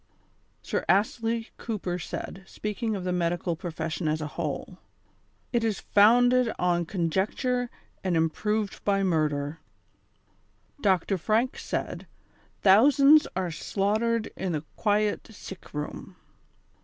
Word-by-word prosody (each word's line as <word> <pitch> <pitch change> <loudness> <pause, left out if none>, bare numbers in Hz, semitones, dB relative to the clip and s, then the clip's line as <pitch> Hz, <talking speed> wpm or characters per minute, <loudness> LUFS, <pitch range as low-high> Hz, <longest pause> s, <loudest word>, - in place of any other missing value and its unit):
Sir - - -2
Astley 225 +4 +1
Cooper 185 -6 -3
said, 185 +2 -6
speaking 210 +1 -3
of 190 - -4
the 180 - -1
medical 175 0 0
profes 165 -1 -4
sion 160 +1 -2
as 155 +1 +1
a 155 - -3
whole: 170 +3 -4 0.3
" - - -40
It 235 -1 +2
is 220 -3 0
founded 245 +3 +5
on 175 -2 +1
conjecture 210 - 0 0.3
and 180 -3 +1
im 160 0 +2
proved 210 +2 -2
by 195 -1 +2
murder." 155 -3 0 1.2
Dr. 190 -1 +2
Franke 225 +8 +1
said: - - -4 0.3
" - - -35
Thousands 280 +9 +7
are 185 -2 -1
slaughtered 215 +7 0
in 185 -2 -2
the 150 -1 -2
quiet 210 -1 +1
sick 195 -3 -10
room." 150 0 -6
195 Hz, 130 wpm, -27 LUFS, 170-225 Hz, 1.2 s, Thousands